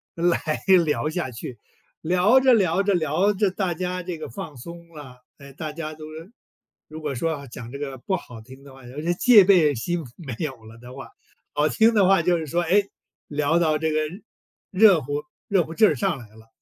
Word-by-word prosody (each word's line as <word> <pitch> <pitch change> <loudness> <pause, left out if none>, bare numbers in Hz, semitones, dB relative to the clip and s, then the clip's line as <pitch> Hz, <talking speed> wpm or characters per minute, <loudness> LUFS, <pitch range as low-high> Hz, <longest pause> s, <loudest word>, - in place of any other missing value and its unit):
来 170 +1 +1 0.4
聊 150 0 -1
下 155 -6 -3
去， 115 0 -8 0.4
聊 180 +9 +4
着 260 -1 +4
聊 190 -3 +2
着 200 -1 +1
聊 175 +5 +1
着 195 -1 0
大 185 -3 -2
家 180 +1 -4
这 175 -2 -5
个 155 - -8
放 145 +4 -8
松 170 +6 -11
了。 130 -6 -13
哎， 140 -1 -13
大 155 0 -6
家 155 -1 -6
都 155 0 -11
是 165 +7 -11 0.6
如 155 +1 -10
果 150 -2 -3
说 165 +6 -1
要 140 -3 -6
讲 120 -1 -10
这 140 - -7
个 135 -2 -6
不 190 +10 -2
好 125 -10 -9
听 130 +4 -15
的 140 -1 -14
话， 135 -2 -15
有 125 +3 -12
些 150 - -5
这 - - -5
个 - - +3
戒 215 +2 +6
备 170 -7 +4
心 170 +8 -3
没 135 -9 -7
有 130 -7 -5
了 115 +1 -13
的 125 +2 -12
话， 135 - -10 0.4
好 150 +1 +1
听 225 +6 +3
的 200 -4 +4
话 195 -2 +4
就 175 0 +2
是 160 - -5
说， 170 +5 0
哎， 195 +5 +3 0.4
聊 150 +3 0
到 155 -2 +2
这 160 +1 -1
个， 155 - 0 0.7
热 190 -4 +5
乎 145 +3 -4 0.2
热 195 -3 +2
乎 165 - -9
劲 215 +4 +5
儿 - - +1
上 190 -7 -1
来 115 -4 -12
了， 110 0 -17
160 Hz, 240 characters per minute, -23 LUFS, 140-180 Hz, 0.7 s, 戒